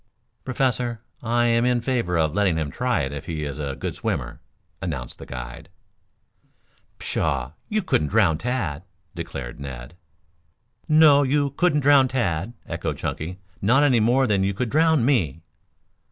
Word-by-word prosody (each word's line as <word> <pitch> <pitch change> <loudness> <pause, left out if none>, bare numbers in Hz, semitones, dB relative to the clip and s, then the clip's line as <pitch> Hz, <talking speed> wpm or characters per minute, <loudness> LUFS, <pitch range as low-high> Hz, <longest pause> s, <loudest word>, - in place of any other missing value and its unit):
"Professor, 125 -3 -1 0.2
I 120 0 +1
am 115 0 +3
in 125 0 +2
favor 115 -8 0
of 80 -2 +1
letting 95 -4 +2
him 75 -3 -2
try 125 - 0
it 65 -1 -2
if 70 +2 -7
he 80 -2 -3
is 70 0 -5
a 70 -2 -3
good - - -4
swimmer," - - -3 0.4
announced 70 -10 -5
the - - -10
guide. 65 -1 -8 1.3
"Pshaw, 65 -2 -1 0.2
you 215 -1 0
couldn't 75 - +1
drown 95 -5 +3
Tad," 100 - -2 0.3
declared - - -6
Ned. 65 -1 -8 1.0
"No, 155 -2 +7
you 140 +1 +1
couldn't 150 0 +2
drown 140 -1 +6
Tad," 110 -5 -1
echoed - - -3
Chunky. 85 +4 -4 0.2
"Not 120 +8 +4
any 130 -5 +4
more 125 +5 +3
than 100 -5 +2
you 100 0 0
could 120 +1 -2
drown 160 -4 +3
me." 85 - +1
110 Hz, 155 wpm, -24 LUFS, 75-130 Hz, 1.3 s, No